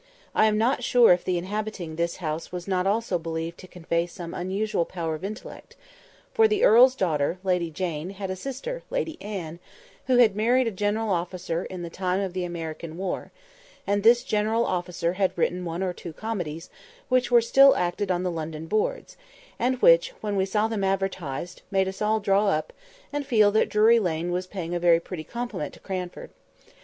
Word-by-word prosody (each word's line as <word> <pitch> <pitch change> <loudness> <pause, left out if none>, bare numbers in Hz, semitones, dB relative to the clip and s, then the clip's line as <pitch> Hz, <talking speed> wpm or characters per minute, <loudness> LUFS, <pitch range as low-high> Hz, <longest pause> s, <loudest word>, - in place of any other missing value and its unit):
I 215 - +4
am 210 -1 +2
not 245 +3 +1
sure 240 -5 +6
if 175 - -1
the 180 -1 0
inhabiting 195 -3 -4
this 170 +1 -1
house 160 -2 -4
was 180 0 -6
not 185 -1 0
also 205 -3 0
believed 165 +1 -5
to 185 - -11
convey 170 -1 -2
some 175 -1 -8
unusual 190 +1 -1
power 165 -2 -4
of 155 +3 -7
intellect; 210 +2 -8 0.6
for 445 0 +5
the 425 -1 0
earl's 255 +4 +7
daughter, 160 - 0
Lady 180 -3 0
Jane, 165 0 -4
had 195 -1 -5
a - - -3
sister, 275 - -5
Lady 340 -11 -3
Anne, 175 -6 -6 0.5
who 255 -2 +4
had 225 -5 +5
married 245 +4 +3
a 230 - -1
general 210 +2 -1
officer 175 -1 -2
in 185 -2 -7
the 170 - -5
time 185 +1 -1
of 195 -3 -3
the 185 -1 -2
American 165 -1 -6
war, 190 0 -4 0.5
and 205 0 +1
this 235 +3 +5
general 220 -1 +1
officer 175 -1 -1
had 190 -1 0
written 180 +1 0
one 170 +2 -3
or 185 -1 -1
two 170 -2 -9
comedies, 175 -7 -5 0.4
which 255 -1 +2
were 240 -1 +6
still 270 +4 +6
acted 180 +3 -1
on 180 -1 0
the 180 - -1
London 160 -1 -5
boards, 215 - -2 0.4
and 255 +2 0
which, - - +6
when 205 -1 -3
we 190 -1 +2
saw 210 +2 +1
them 220 -3 -2
advertised, 185 -4 -2
made 190 -1 +1
us 190 +2 -6
all 215 +1 +2
draw 200 0 +2
up, 155 -5 0 0.4
and 290 0 -1
feel 220 -7 +4
that 215 - +2
Drury 220 +2 +5
Lane 175 -3 -1
was 180 +1 -2
paying 175 -3 -5
a 175 - 0
very 170 -1 +5
pretty 170 -1 -7
compliment 235 -8 -5
to - - -16
Cranford. 185 -2 -6
190 Hz, 195 wpm, -25 LUFS, 175-220 Hz, 0.6 s, earl's